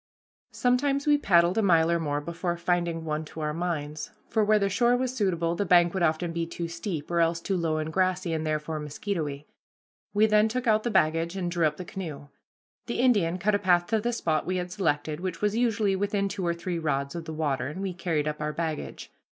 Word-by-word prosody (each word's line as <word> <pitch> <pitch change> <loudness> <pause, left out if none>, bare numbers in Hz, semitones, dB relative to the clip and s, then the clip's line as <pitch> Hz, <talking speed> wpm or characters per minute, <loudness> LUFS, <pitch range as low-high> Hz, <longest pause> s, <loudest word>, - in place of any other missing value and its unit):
Sometimes 275 +3 +1
we 295 -1 +5
paddled 175 -4 +4
a - - +3
mile 170 -4 +4
or 170 - +2
more 145 -2 -1
before 170 +2 -3
finding 170 -1 -1
one 155 0 -2
to 160 - -8
our 150 0 -1
minds, 155 -3 -3 0.2
for 220 -2 +2
where 215 +1 +4
the 200 -1 +1
shore 240 +5 +3
was 255 0 -2
suitable 170 -6 0
the 190 - -1
bank 175 -2 +4
would 190 - -2
often 165 +1 +1
be 165 0 -2
too 170 0 -4
steep, 170 -2 -5
or 170 - +1
else 165 0 +2
too 190 +3 -2
low 165 -3 0
and 155 0 -3
grassy, 185 -2 +1
and 160 -1 -1
therefore 155 0 -2
mosquitoey. 150 -1 -4 0.7
We 210 +1 +4
then 215 0 +4
took 250 +3 -3
out 215 -2 +4
the 240 - -2
baggage 165 -3 +1
and 175 -2 -2
drew 170 -2 +2
up 150 0 -4
the 180 - -6
canoe. 155 -7 -7 0.6
The 235 - -2
Indian 205 -9 +3
cut 205 +4 +1
a 205 - +2
path 175 -3 +3
to 220 -1 +2
the 240 +2 0
spot 165 -9 -1
we 185 - 0
had 180 0 -4
selected, 155 -5 -1
which 180 -2 -4
was 210 0 0
usually 220 -4 +2
within 200 +1 0
two 190 -2 -3
or 170 - +1
three 170 0 -3
rods 140 -3 -1
of 170 -1 -6
the 160 - -6
water, 145 -4 -1
and 150 +6 -6
we 195 -2 -3
carried 165 -4 -1
up 150 0 -3
our 150 0 -2
baggage. 160 -2 -4
170 Hz, 230 wpm, -27 LUFS, 160-200 Hz, 0.7 s, we